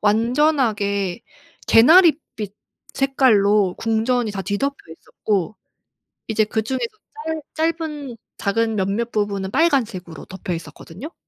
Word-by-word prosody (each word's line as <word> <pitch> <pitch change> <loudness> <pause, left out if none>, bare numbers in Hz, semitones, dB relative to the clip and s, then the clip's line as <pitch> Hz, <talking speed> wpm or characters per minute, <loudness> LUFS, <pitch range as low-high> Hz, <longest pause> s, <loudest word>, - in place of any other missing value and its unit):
완전하게 215 - +1 0.4
개나리 320 +7 +7 0.2
빛 205 -2 -6 0.4
색깔로 210 -8 +3
궁전이 225 +1 0
다 200 -1 -4
뒤덮여 275 +9 -1 0.2
있었고 195 +4 -3 0.7
이제 220 -1 +2
그중에서 225 - -2 0.7
짧 320 +1 +2
짧은 295 -6 -6 0.2
작은 225 +2 0
몇몇 205 +4 -1
부분은 200 -2 -2
빨간색으로 225 - 0
덮여 190 -1 -5
있었거든요. 165 - -9
220 Hz, 260 characters per minute, -21 LUFS, 200-265 Hz, 0.7 s, 개나리